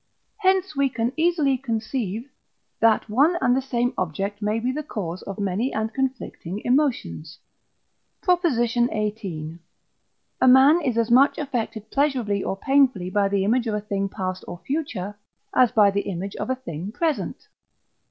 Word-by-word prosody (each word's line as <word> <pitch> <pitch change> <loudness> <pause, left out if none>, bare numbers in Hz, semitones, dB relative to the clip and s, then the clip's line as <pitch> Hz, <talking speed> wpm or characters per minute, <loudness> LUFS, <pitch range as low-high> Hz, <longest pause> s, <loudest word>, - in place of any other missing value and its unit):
Hence 380 -4 +1
we 275 -1 +2
can 235 0 -2
easily 315 -5 +2
conceive, 230 -1 -3 0.5
that 225 -1 +3
one 285 +11 +3
and 250 -1 +3
the 265 - +1
same 245 -2 -1
object 195 +4 -3
may 210 +2 0
be 245 +3 -1
the 300 +4 -3
cause 190 - -5
of 195 - -7
many 205 +5 -1
and 220 0 -2
conflicting 260 -8 -3
emotions. 235 - 0 0.9
PROP. 360 -2 +3
XVIII. 215 - -1 0.8
A 260 - +5
man 270 +6 +7
is 250 -6 -1
as 230 0 +1
much 265 +4 +5
affected 230 -6 -4
pleasurably 250 -9 +1
or 195 - -2
painfully 255 -8 +2
by 205 -1 +2
the 195 -1 0
image 235 +3 +1
of 215 - -1
a - - 0
thing 200 -1 -2
past 185 -2 -4
or 175 - -6
future 220 - -3 0.3
as 250 -3 +4
by 205 -2 +5
the 200 +1 0
image 195 +1 -5
of - - -4
a 260 - +1
thing 195 -7 -6
present. 315 +5 -2
230 Hz, 160 wpm, -24 LUFS, 200-270 Hz, 0.9 s, man